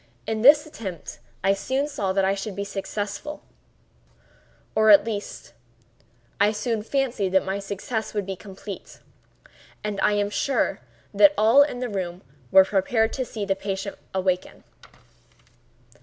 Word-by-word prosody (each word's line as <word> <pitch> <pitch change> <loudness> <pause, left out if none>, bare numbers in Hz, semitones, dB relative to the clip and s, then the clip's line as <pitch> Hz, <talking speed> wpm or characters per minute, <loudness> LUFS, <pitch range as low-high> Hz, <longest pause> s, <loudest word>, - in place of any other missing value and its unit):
In 220 0 -2
this 295 +5 +7
attempt 200 - -8 0.2
I 195 +1 +4
soon 265 +8 -1
saw 200 -10 -2
that 190 0 +2
I 195 - +2
should 200 0 -5
be 200 - -3
successful—or 205 +8 -5 1.5
at 200 -2 +8
least 205 - -6 0.9
I 205 +1 +4
soon 220 +1 -2
fancied 235 -5 -1
that 190 - +3
my 190 +1 -2
success 200 +3 -4
would 205 -2 -1
be 195 0 -4
complete—and 200 +1 -10
I - - +3
am 205 0 0
sure 275 +5 0 0.3
that 300 -1 +6
all 225 +6 +6
in 285 -4 +1
the 250 - -1
room 185 -4 -4 0.3
were 190 +5 +7
prepared 220 +4 +1
to 260 - -2
see 215 -4 -5
the 195 -1 0
patient 195 0 -4 0.2
awaken. 185 -1 -2
205 Hz, 140 wpm, -24 LUFS, 195-230 Hz, 1.5 s, at